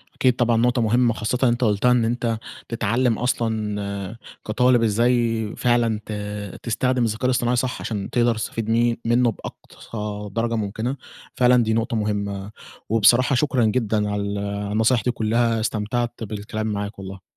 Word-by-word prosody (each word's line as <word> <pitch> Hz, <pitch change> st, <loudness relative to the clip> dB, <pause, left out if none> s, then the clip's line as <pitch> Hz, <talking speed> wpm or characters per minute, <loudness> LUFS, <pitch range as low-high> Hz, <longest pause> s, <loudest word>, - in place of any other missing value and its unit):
أكيد 130 Hz, -2 st, +2 dB
طبعًا، 120 Hz, -2 st, +2 dB
نقطة 120 Hz, +2 st, +2 dB
مهمّة 120 Hz, +1 st, +3 dB
خاصةً 120 Hz, +4 st, 0 dB
أنت 120 Hz, +2 st, 0 dB
قلتها 110 Hz, +2 st, +3 dB
إن 120 Hz, -2 st, +3 dB
أنت 115 Hz, -1 st, -1 dB, 0.3 s
تتعلم 115 Hz, +1 st, +1 dB
أصلًا 105 Hz, -4 st, -2 dB, 0.3 s
كطالب 125 Hz, +2 st, +3 dB
إزاي 115 Hz, 0 st, +2 dB
فعلًا 120 Hz, -3 st, +2 dB
ت -, -, -8 dB, 0.5 s
تستخدم 125 Hz, +2 st, 0 dB
الذكاء 110 Hz, +2 st, -1 dB
الاصطناعي 125 Hz, -1 st, +2 dB
صح، 125 Hz, +1 st, -1 dB
عشان 105 Hz, -3 st, -4 dB
تقدر 120 Hz, -1 st, +2 dB
تستفيد 110 Hz, 0 st, -4 dB
م 115 Hz, +1 st, +2 dB
منّه 120 Hz, +1 st, +3 dB
بأقصى 105 Hz, -1 st, -7 dB
درجة 115 Hz, +1 st, 0 dB
ممكنة. 110 Hz, +4 st, -2 dB, 0.4 s
فعلًا 125 Hz, -1 st, +4 dB
دي 110 Hz, 0 st, 0 dB
نقطة 115 Hz, +2 st, 0 dB
مهمّة، 100 Hz, -2 st, -2 dB, 0.4 s
وبصراحة 120 Hz, +4 st, +4 dB
شكرًا 130 Hz, -3 st, +2 dB
جدًا 110 Hz, -2 st, 0 dB
على 105 Hz, 0 st, -1 dB
ال 100 Hz, 0 st, -3 dB
على 100 Hz, 0 st, -3 dB
النصايح 110 Hz, +3 st, +2 dB
دي 125 Hz, -, +1 dB
كلّها، 115 Hz, 0 st, +1 dB
استمتعت 115 Hz, +2 st, -2 dB
بالكلام 110 Hz, +1 st, -4 dB
معاك 105 Hz, -1 st, -4 dB
والله. 95 Hz, 0 st, -8 dB
115 Hz, 150 wpm, -22 LUFS, 105-120 Hz, 0.5 s, فعلًا